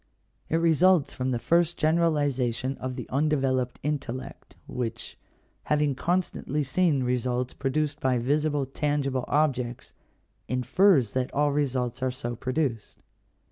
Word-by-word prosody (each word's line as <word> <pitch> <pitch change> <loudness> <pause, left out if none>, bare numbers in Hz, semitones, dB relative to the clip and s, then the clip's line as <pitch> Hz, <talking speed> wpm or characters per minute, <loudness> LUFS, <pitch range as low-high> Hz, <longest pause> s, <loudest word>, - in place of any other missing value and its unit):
It - - +1
results 165 0 +3
from 130 0 -2
the 125 - 0
first 170 +6 +1
generalization 145 -6 +1
of 130 -1 -4
the 125 - -6
undeveloped 135 -3 +1
intellect, 135 -2 -5
which, 120 -1 -5 0.5
having 150 -1 +2
constantly 165 -2 -1
seen 145 -1 +1
results 125 0 -1
produced 145 +2 -1
by 130 -4 +1
visible, 145 +3 0
tangible 135 -1 -1
objects, 130 -5 -1 0.5
infers 125 - +3
that 130 -1 -1
all 145 +1 +2
results 130 -3 -1
are 130 - +1
so 125 -2 -4
produced. 130 -3 -3
135 Hz, 120 wpm, -27 LUFS, 125-150 Hz, 0.5 s, results